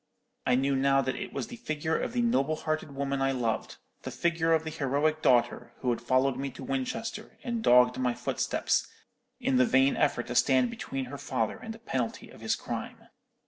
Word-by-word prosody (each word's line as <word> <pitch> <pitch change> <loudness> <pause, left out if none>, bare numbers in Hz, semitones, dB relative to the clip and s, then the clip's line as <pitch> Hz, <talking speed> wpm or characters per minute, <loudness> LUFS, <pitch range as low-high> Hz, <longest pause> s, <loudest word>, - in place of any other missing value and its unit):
I 125 - +4
knew 135 +2 +2
now 135 +1 +3
that 130 - -2
it - - -5
was - - -3
the 240 - -9
figure 160 -6 -2
of - - -2
the 240 -1 +1
noble 155 - +2
hearted 155 -2 -3
woman 140 0 -1
I 135 0 +2
loved—the 120 -3 -4
figure 170 -1 0
of 160 -1 +3
the 160 - -5
heroic 150 +3 0
daughter, 120 -1 +2
who 125 - +1
had 120 - -2
followed 130 +2 +2
me 135 +1 -2
to 130 - -9
Winchester, 135 - -4
and 235 -2 -2
dogged 125 - +5
my 125 -2 +1
footsteps, - - 0 0.5
in 130 - +1
the 125 - +6
vain 135 +1 +4
effort 140 -5 +1
to 120 - -5
stand 130 -2 +4
between 135 -1 -4
her 140 +2 -8
father 110 - -1
and 225 - -7
the 225 - -8
penalty 130 - -3
of - - -14
his - - +1
crime. - - -6
135 Hz, 200 wpm, -29 LUFS, 130-155 Hz, 0.5 s, the